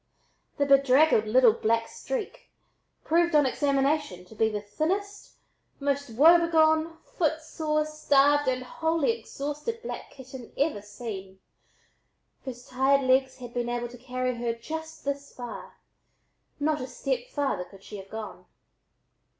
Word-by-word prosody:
The 285 - +2
bedraggled 275 -3 +5
little 240 0 +6
"black 230 +1 0
streak" - - -6 0.5
proved 340 0 +2
on 295 -1 +6
examination 275 - 0
to 180 - -15
be 220 +1 +2
the 210 -1 -3
thinnest, 375 - -3 0.5
most 280 -1 -1
woebegone, 320 +3 +4 0.2
footsore, 315 -1 0
starved 290 -2 +3
and 255 0 -1
wholly 320 - 0
exhausted 300 +2 -5
black - - -6
kitten 260 -2 -11
ever 280 -7 0
seen, 205 -2 -8 1.1
whose 250 -2 -7
tired 270 +2 +2
legs 260 0 +2
had 245 -2 -9
been 240 -1 -2
able 240 0 -2
to 245 - -12
carry 255 0 -2
her 235 -1 -1
just 320 +8 -7
this 280 0 -3
far 245 -1 -9 0.8
not 300 0 0
a 255 - -4
step 250 -1 -3
farther 275 -11 -1
could 195 +2 -17
she 210 - -8
have 195 0 -11
gone. 220 -1 -7
275 Hz, 135 wpm, -27 LUFS, 240-310 Hz, 1.1 s, little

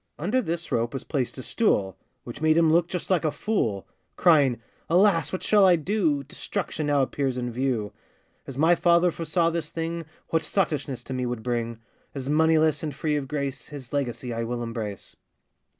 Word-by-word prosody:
Under 210 +12 +1
this 170 -4 -4
rope 115 +2 0
was 135 - -4
placed 135 -4 -2
a 130 - -6
stool, 100 - +1 0.3
Which 120 +4 -9
made 155 0 +4
him 165 -2 +5
look 170 0 +3
just 180 +1 -4
like 180 -5 +3
a 155 - +2
fool; 110 - -1 0.3
Crying, 145 -9 +4 0.3
'Alas! 175 -1 +4
what 185 - -4
shall 210 -2 +4
I 185 -2 +7
do? 160 -4 0
Destruction 150 +2 -4
now 145 -2 +3
appears 135 -1 -1
in 125 -1 -2
view! 120 -4 -1 0.5
'As 135 - -7
my 160 +4 +5
father 170 0 +4
foresaw 165 +1 0
this 165 -2 -3
thing, 165 0 -4 0.2
What 165 - +2
sottishness 150 -7 -1
to 130 - -6
me 125 -1 -1
would 120 -2 -4
bring; 115 -2 -2 0.3
As 135 -1 -5
moneyless, 155 -1 +3
and 150 -3 -4
free 150 +2 -1
of 140 -2 -2
grace, 140 -2 -4
His 140 -4 -10
legacy 125 -3 -2
I 115 0 -2
will 120 +1 -3
embrace. 115 -4 -5
150 Hz, 185 wpm, -26 LUFS, 125-165 Hz, 0.5 s, I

